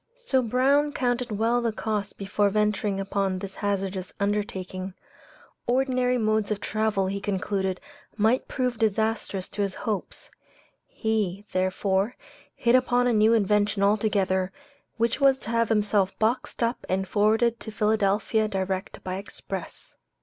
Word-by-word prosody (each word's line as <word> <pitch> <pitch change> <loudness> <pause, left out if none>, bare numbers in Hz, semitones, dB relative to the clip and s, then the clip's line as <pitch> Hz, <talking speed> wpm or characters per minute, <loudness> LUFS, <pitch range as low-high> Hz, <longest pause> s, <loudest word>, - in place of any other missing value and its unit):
So 475 - +1
Brown 275 +5 +2
counted 245 -2 0
well 225 +3 +1
the 230 -1 0
cost 210 -2 -3
before 200 +1 +1
venturing 210 -1 0
upon 195 -1 -1
this 195 0 -6
hazardous 195 -2 -2
undertaking. 190 -2 -2 0.7
Ordinary 250 0 +2
modes 215 -2 +1
of 210 -2 -1
travel 215 -2 0
he 195 +1 -3
concluded 190 -1 -1 0.4
might 225 +4 +2
prove 250 -3 -2
disastrous 220 -3 0
to 205 - -4
his 195 -2 -1
hopes; 210 -4 -4 0.6
he, 210 -3 -1
therefore, 190 +4 0 0.4
hit 235 -1 +2
upon 245 -1 +3
a 245 - +3
new 215 +1 +5
invention 210 -1 +2
altogether, 200 -3 +2 0.5
which 230 +4 0
was 270 -1 +5
to 230 - -7
have 230 -1 +2
himself 210 -3 +2
boxed 235 +2 0
up 230 +2 -1
and 190 +1 0
forwarded 220 +4 +2
to 220 - -7
Philadelphia 215 0 +1
direct 190 -1 -3
by 185 0 -3
express. 200 - -8
210 Hz, 135 wpm, -26 LUFS, 195-230 Hz, 0.7 s, new